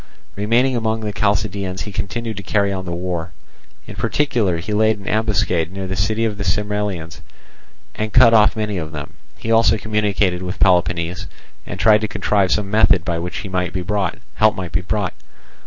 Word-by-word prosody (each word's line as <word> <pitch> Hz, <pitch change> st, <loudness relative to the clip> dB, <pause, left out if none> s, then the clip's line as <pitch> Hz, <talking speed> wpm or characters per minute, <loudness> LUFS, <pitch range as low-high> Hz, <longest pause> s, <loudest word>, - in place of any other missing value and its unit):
Remaining 120 Hz, +6 st, +2 dB
among 110 Hz, -1 st, -1 dB
the 105 Hz, -1 st, -3 dB
Chalcidians, 100 Hz, -2 st, -1 dB
he 105 Hz, -, -6 dB
continued 105 Hz, +4 st, -4 dB
to -, -, -4 dB
carry 100 Hz, +1 st, +1 dB
on 95 Hz, -1 st, -4 dB
the 85 Hz, -, -4 dB
war; 85 Hz, -1 st, -4 dB, 0.5 s
in -, -, -9 dB
particular 115 Hz, -12 st, 0 dB
he 95 Hz, +6 st, -4 dB
laid 110 Hz, +1 st, +3 dB
an 100 Hz, -, -12 dB
ambuscade 100 Hz, -6 st, 0 dB
near 95 Hz, 0 st, -5 dB
the 95 Hz, 0 st, -3 dB
city 110 Hz, +4 st, 0 dB
of 105 Hz, -2 st, -3 dB
the -, -, -2 dB
Sermylians, 100 Hz, -3 st, -2 dB, 0.7 s
and 110 Hz, 0 st, -3 dB
cut 120 Hz, -1 st, +6 dB
off 110 Hz, 0 st, +5 dB
many 105 Hz, -3 st, -2 dB
of 80 Hz, -1 st, -6 dB
them; 70 Hz, -2 st, -7 dB, 0.2 s
he 115 Hz, -, -4 dB
also 115 Hz, 0 st, +4 dB
communicated 105 Hz, -3 st, 0 dB
with 90 Hz, +1 st, -5 dB
Peloponnese, 90 Hz, -1 st, +1 dB, 0.4 s
and 90 Hz, -, -6 dB
tried 105 Hz, 0 st, +5 dB
to 110 Hz, -, -1 dB
contrive 100 Hz, -2 st, +1 dB
some 100 Hz, -2 st, 0 dB
method 100 Hz, -5 st, +4 dB
by 85 Hz, -2 st, -1 dB
which 90 Hz, +3 st, -5 dB
help 95 Hz, -2 st, -8 dB, 1.0 s
might 95 Hz, -, -4 dB
be 85 Hz, -, +1 dB
brought. 100 Hz, -5 st, -1 dB
100 Hz, 175 wpm, -20 LUFS, 90-110 Hz, 1.0 s, cut